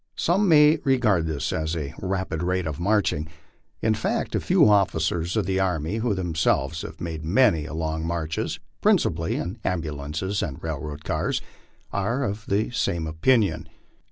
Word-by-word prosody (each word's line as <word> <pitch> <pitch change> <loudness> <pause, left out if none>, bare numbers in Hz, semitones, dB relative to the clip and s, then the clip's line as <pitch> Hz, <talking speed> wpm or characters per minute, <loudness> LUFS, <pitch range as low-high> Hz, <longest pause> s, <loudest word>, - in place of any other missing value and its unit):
Some 190 +4 +2
may 150 0 +7
regard 110 - +2
this 80 -3 -2
as 80 +1 -1
a 75 -3 -4
rapid 95 -4 -2
rate 90 0 0
of 80 0 -4
marching; 95 -5 +1 0.6
in 110 - +3
fact, - - -2
a - - +2
few - - +4
officers 90 -3 +2
of 105 - +1
the 95 +1 0
army 90 0 0
who 110 -2 0
themselves 80 -4 0
have - - -8
made 80 -2 -5
many 85 - +3
and 80 +1 -6
long 80 0 -2
marches 80 -2 -2 0.2
(principally 80 +1 +2
in 95 +7 -4
ambulances 80 +2 -2
and 70 -3 -3
railroad 75 -1 -5
cars) - - -1 0.5
are 115 +7 0
of 105 -2 -4
the 105 +4 0
same 85 -8 -1
opinion. 100 +8 +1
85 Hz, 155 wpm, -25 LUFS, 80-105 Hz, 0.6 s, may